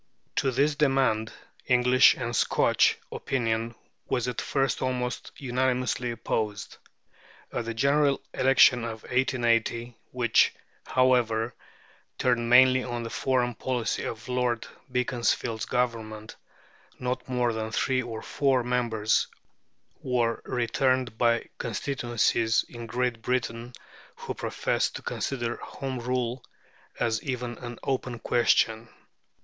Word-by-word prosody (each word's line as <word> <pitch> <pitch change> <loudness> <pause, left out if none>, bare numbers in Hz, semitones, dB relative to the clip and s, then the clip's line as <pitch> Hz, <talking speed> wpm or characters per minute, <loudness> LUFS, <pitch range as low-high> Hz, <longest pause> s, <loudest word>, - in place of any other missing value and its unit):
To 135 - +2
this 140 +4 +2
demand 135 -7 +2 0.4
English 125 0 +5
and 120 -1 -3
Scotch - - +3
opinion 115 -2 -1 0.3
was 125 -1 0
at 125 - -2
first 135 -2 0
almost 125 -1 -2
unanimously 125 -2 0
opposed. 110 -2 -3 0.8
At 120 - -2
the 115 0 -4
General 140 +3 +3
Election 130 -2 +5
of 110 -1 -5
1880, 120 -2 0
which, 120 -3 +3 0.3
however, 120 -3 +2 0.6
turned 120 -2 +1
mainly 130 +1 +6
on 120 -1 -4
the 115 - -6
foreign 125 -2 0
policy 125 +1 -2
of 110 +1 -6
Lord 125 -2 0 0.3
Beaconsfield's 120 -2 0
Government, 110 -3 -2 0.6
not 125 +1 -3
more 125 -2 +1
than 110 0 -3
three 130 +3 +1
or 115 -3 -6
four 135 -3 +1
members 120 -3 +1 0.7
were 120 -3 0
returned 125 0 0
by 115 0 +2
constituencies 115 -1 0
in 120 -1 -9
Great 120 0 -1
Britain 120 0 -2 0.4
who - - -6
professed - - -1
to - - -7
consider 120 -3 -3
Home 135 -2 -5
Rule 125 0 -2 0.6
as 110 -1 0
even 125 -3 -4
an 120 -1 -7
open 125 -2 -2
question. 115 -1 +2
120 Hz, 115 wpm, -27 LUFS, 115-130 Hz, 0.8 s, mainly